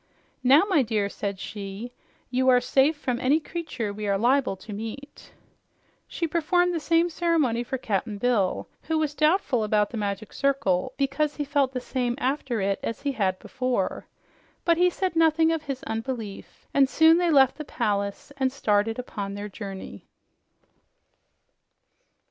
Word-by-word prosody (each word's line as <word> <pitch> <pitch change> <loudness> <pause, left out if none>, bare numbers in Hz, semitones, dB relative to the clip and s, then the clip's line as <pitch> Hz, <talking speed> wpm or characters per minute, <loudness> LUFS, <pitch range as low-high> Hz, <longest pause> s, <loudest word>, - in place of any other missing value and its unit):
"Now, 275 +6 +6
my 360 -8 +4
dear," 215 -4 0
said 200 -1 -4
she, 205 +4 -6 0.4
"you 260 +1 +2
are 250 -1 +6
safe 270 +5 +2
from 250 -5 -2
any 275 +5 +3
creature 295 -10 -4
we 210 0 -5
are 200 -1 +2
liable 245 0 +2
to 200 +3 -10
meet." 225 +7 -8 0.8
She 340 - -3
performed 350 +2 +2
the 335 - -1
same 330 +2 +2
ceremony 320 -8 +1
for 265 +2 -3
Cap'n 210 -2 -2
Bill, 205 -4 0
who 320 - -1
was 305 -2 0
doubtful 305 - +2
about 210 -1 +1
the 235 - -5
Magic 205 0 -3
Circle 260 -7 +1
because 275 +2 0
he 295 - -3
felt 280 -2 +1
the 255 - -3
same 245 -1 -2
after 265 -3 -1
it 195 0 0
as 230 - -4
he 285 - 0
had 195 -7 0
before. 255 -7 -2 0.6
But 335 -1 +4
he 360 +1 +5
said 370 0 -2
nothing 325 0 +4
of 325 -1 -1
his 275 -3 -5
unbelief, 225 -2 -6
and 275 -1 +4
soon 320 +3 +5
they 350 -1 +2
left 270 -2 +4
the - - -3
palace 205 -1 -2
and 265 -2 +1
started 225 -4 +1
upon 200 -5 -5
their 205 +1 -5
journey. 195 - -8
255 Hz, 160 wpm, -26 LUFS, 210-300 Hz, 0.8 s, Now